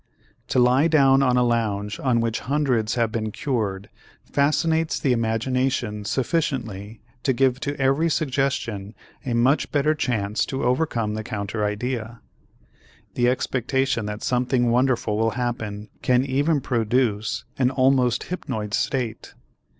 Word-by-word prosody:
To - - -1
lie 125 +5 +4
down 135 -4 +5
on 125 -2 +3
a 125 - +4
lounge 110 -3 -1
on 125 -3 +1
which 115 -1 -1
hundreds 130 -6 0
have 115 -2 +1
been 110 -1 -2
cured 105 -6 -2 0.4
fascinates 160 +3 +1
the 135 -4 +2
imagination 115 -1 -1
sufficiently 115 - -2 0.2
to 135 - +1
give 130 0 +2
to 145 +1 -4
every 135 +5 +2
suggestion 130 -9 -1 0.3
a 120 - 0
much 130 +5 +2
better 150 +1 +2
chance 110 -8 -1
to 135 - -3
overcome 125 -5 0
the 110 0 -4
counter 105 -1 -3
idea. 115 +2 -3 0.9
The 120 0 +2
expectation 130 -2 0
that 105 0 -5
something 125 -1 +1
wonderful 120 -4 +1
will 115 0 +2
happen 115 -4 -3
can 125 +1 +2
even 140 +3 +1
produce 110 -3 0 0.2
an 125 -1 +3
almost 130 -2 +2
hypnoid 110 - -4
state. 120 -3 -2
125 Hz, 135 wpm, -23 LUFS, 110-135 Hz, 0.9 s, down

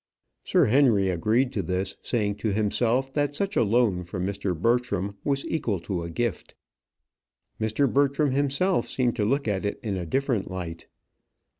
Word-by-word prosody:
Sir 180 -5 +3
Henry 110 -6 +4
agreed 110 +9 +1
to 100 - -1
this, 90 +2 -2
saying 105 -4 -1
to 105 0 -1
himself 120 +5 +1
that 145 -1 0
such 200 +4 -2
a - - +4
loan 105 -4 +2
from 90 +1 -4
Mr. 100 -3 -2
Bertram 105 -3 0
was 140 -1 0
equal 115 - -1
to 90 -1 -3
a 85 - -5
gift. 115 +5 -3 1.0
Mr. 110 +6 +1
Bertram 140 +2 +2
himself 140 +3 +1
seemed 125 -2 0
to 105 - +1
look 140 +3 0
at 100 -2 -1
it 100 - -2
in 100 -4 -2
a 90 -2 -4
different 130 - 0
light. 85 -3 -6
110 Hz, 165 wpm, -26 LUFS, 95-135 Hz, 1.0 s, Henry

